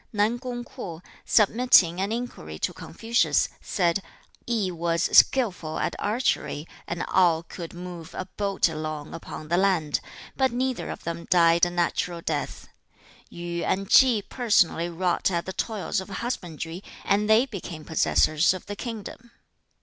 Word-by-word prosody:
Nan 215 Hz, +3 st, +1 dB
kung 245 Hz, -1 st, -5 dB
Kwo, 185 Hz, -10 st, -8 dB, 0.2 s
submitting 205 Hz, -5 st, +4 dB
an 200 Hz, +2 st, -1 dB
inquiry 225 Hz, -, -5 dB
to -, -, -2 dB
Confucius, 230 Hz, +7 st, 0 dB
said, 175 Hz, -1 st, 0 dB, 0.5 s
'I 215 Hz, -6 st, 0 dB
was 170 Hz, -1 st, 0 dB
skillful 185 Hz, -11 st, +4 dB
at -, -, -1 dB
archery, 205 Hz, -, -1 dB, 0.2 s
and 170 Hz, 0 st, -3 dB
Ao 170 Hz, -3 st, +4 dB
could 170 Hz, -1 st, -8 dB
move 175 Hz, -1 st, -8 dB
a 185 Hz, -, -4 dB
boat 200 Hz, 0 st, 0 dB
along 155 Hz, -2 st, -5 dB
upon 155 Hz, -2 st, -8 dB
the 175 Hz, -, +2 dB
land, 180 Hz, -6 st, +2 dB, 0.4 s
but 265 Hz, -2 st, +2 dB
neither 255 Hz, +1 st, -2 dB
of -, -, -7 dB
them 170 Hz, 0 st, -5 dB
died 170 Hz, -1 st, +5 dB
a -, -, -3 dB
natural 175 Hz, 0 st, -1 dB
death. 150 Hz, -3 st, -3 dB, 0.6 s
Yu 170 Hz, 0 st, -5 dB
and 195 Hz, +1 st, -1 dB
Chi 245 Hz, -6 st, +6 dB
personally 190 Hz, -8 st, +2 dB
wrought 175 Hz, +2 st, 0 dB
at 170 Hz, -2 st, -1 dB
the 190 Hz, -, -5 dB
toils 210 Hz, -2 st, -2 dB
of 190 Hz, -, -10 dB
husbandry, 180 Hz, -5 st, -5 dB, 0.2 s
and 210 Hz, +1 st, +2 dB
they 220 Hz, +4 st, +6 dB
became 175 Hz, -, -8 dB
possessors 160 Hz, +1 st, +3 dB
of 185 Hz, -, -9 dB
the 205 Hz, -, -6 dB
kingdom.' 230 Hz, +1 st, -7 dB
185 Hz, 150 wpm, -26 LUFS, 170-220 Hz, 0.6 s, Chi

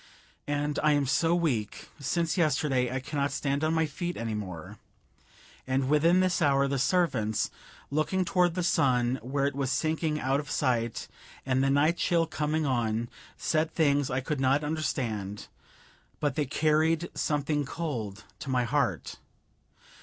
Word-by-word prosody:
And 145 Hz, 0 st, -1 dB
I 150 Hz, 0 st, +4 dB
am 145 Hz, -1 st, +2 dB
so 165 Hz, +6 st, +2 dB
weak; 130 Hz, -, -2 dB
since 165 Hz, +4 st, 0 dB
yesterday 145 Hz, -7 st, +1 dB
I 130 Hz, -, -1 dB
cannot 140 Hz, +1 st, -2 dB
stand 140 Hz, +1 st, -1 dB
on 155 Hz, +1 st, +1 dB
my 160 Hz, 0 st, +2 dB
feet 175 Hz, +4 st, -4 dB
anymore. 105 Hz, -8 st, -5 dB, 0.9 s
And 130 Hz, 0 st, 0 dB
within 165 Hz, +5 st, +4 dB
this 185 Hz, -1 st, +1 dB
hour 140 Hz, -2 st, +3 dB
the 140 Hz, -1 st, -1 dB
servants, 130 Hz, -, +1 dB, 0.4 s
looking 170 Hz, +5 st, 0 dB
toward 180 Hz, -2 st, +2 dB
the 180 Hz, -, -1 dB
sun 125 Hz, -5 st, +2 dB
where 135 Hz, +4 st, -1 dB
it 140 Hz, -, 0 dB
was 135 Hz, -1 st, -2 dB
sinking 155 Hz, +1 st, 0 dB
out 135 Hz, +1 st, +1 dB
of 145 Hz, -, -7 dB
sight 120 Hz, -4 st, 0 dB, 0.4 s
and 130 Hz, 0 st, +1 dB
the 135 Hz, -, +2 dB
night 150 Hz, +5 st, +3 dB
chill 170 Hz, -1 st, +2 dB
coming 155 Hz, 0 st, -1 dB
on, 120 Hz, -3 st, 0 dB, 0.3 s
said 155 Hz, 0 st, 0 dB
things 145 Hz, -4 st, +2 dB
I 130 Hz, +1 st, -1 dB
could 145 Hz, +2 st, -3 dB
not 135 Hz, +3 st, +2 dB
understand, 115 Hz, -10 st, -3 dB, 0.7 s
but 145 Hz, -3 st, 0 dB
they 145 Hz, 0 st, -1 dB
carried 155 Hz, +3 st, +1 dB
something 145 Hz, -1 st, 0 dB
cold 120 Hz, -9 st, -4 dB, 0.2 s
to 140 Hz, -, -7 dB
my 125 Hz, -1 st, +2 dB
heart. 120 Hz, -, -1 dB
145 Hz, 155 wpm, -28 LUFS, 130-155 Hz, 0.9 s, I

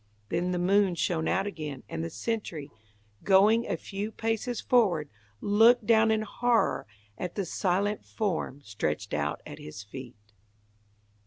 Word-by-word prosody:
Then 175 Hz, +2 st, 0 dB
the 180 Hz, -, 0 dB
moon 190 Hz, +1 st, +3 dB
shone 165 Hz, -1 st, 0 dB
out 190 Hz, +1 st, +1 dB
again, 150 Hz, -9 st, -5 dB
and 80 Hz, -3 st, -4 dB
the 85 Hz, -, -3 dB
sentry, 195 Hz, -, -4 dB, 0.5 s
going 210 Hz, +4 st, +5 dB
a -, -, -1 dB
few 205 Hz, +2 st, -5 dB
paces 225 Hz, +2 st, -2 dB
forward, 180 Hz, -, +2 dB, 0.3 s
looked 225 Hz, +3 st, +5 dB
down 225 Hz, 0 st, +5 dB
in 220 Hz, 0 st, +2 dB
horror 235 Hz, -, +1 dB, 0.3 s
at 180 Hz, -1 st, -4 dB
the 200 Hz, -, -1 dB
silent 195 Hz, +4 st, 0 dB
form 175 Hz, -, -2 dB
stretched 105 Hz, -, -3 dB
out 75 Hz, 0 st, -1 dB
at -, -, -9 dB
his 85 Hz, +8 st, -8 dB
feet. 125 Hz, +3 st, -9 dB
190 Hz, 145 wpm, -28 LUFS, 150-220 Hz, 0.5 s, going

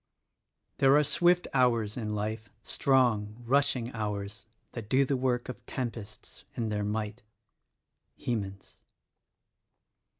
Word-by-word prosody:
"There 135 Hz, +1 st, +6 dB
are 150 Hz, -, +5 dB
swift 175 Hz, +4 st, +3 dB
hours 115 Hz, -5 st, +2 dB
in 105 Hz, -3 st, -3 dB
life, 105 Hz, +1 st, -3 dB
strong, 120 Hz, -6 st, +2 dB
rushing 135 Hz, -2 st, +2 dB
hours, 105 Hz, -1 st, -4 dB, 0.2 s
That 110 Hz, -3 st, -7 dB
do 135 Hz, +1 st, +4 dB
the 135 Hz, -, 0 dB
work 125 Hz, -1 st, 0 dB
of 125 Hz, -5 st, -7 dB
tempests 115 Hz, -4 st, -6 dB
in 115 Hz, -2 st, -1 dB
their 105 Hz, -1 st, -1 dB
might." 105 Hz, +2 st, -3 dB, 0.5 s
— -, -, -52 dB
Hemans. 100 Hz, -5 st, -4 dB
115 Hz, 120 wpm, -30 LUFS, 105-130 Hz, 0.5 s, There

